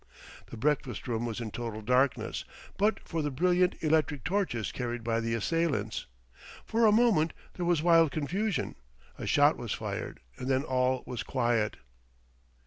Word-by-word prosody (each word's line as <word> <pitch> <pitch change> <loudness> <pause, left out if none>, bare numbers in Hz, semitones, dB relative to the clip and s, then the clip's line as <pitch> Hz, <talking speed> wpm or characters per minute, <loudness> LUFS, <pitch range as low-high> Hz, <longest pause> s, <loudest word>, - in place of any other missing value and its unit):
The 120 - -9
breakfast 135 0 -1
room 120 -1 -1
was 115 0 -4
in 115 -2 -5
total 115 -2 -5
darkness; 125 +4 +1 0.3
but 210 +1 +2
for 165 -2 -2
the 150 - -1
brilliant 180 +5 +2
electric 155 -4 +1
torches 180 - -1
carried 120 -2 -4
by 115 0 0
the 115 0 -1
assailants. 115 -4 -1 0.6
For 225 0 +3
a - - +6
moment 210 -8 +3 0.2
there 175 -1 -3
was 170 -3 +2
wild 165 -2 +6
confusion, 175 +8 -1 0.5
a - - -4
shot - - +4
was - - -3
fired - - -5 0.2
and 125 - -4
then 135 0 +2
all 130 -2 +1
was 125 -2 -4
quiet. 120 -4 0
135 Hz, 155 wpm, -30 LUFS, 120-170 Hz, 0.6 s, a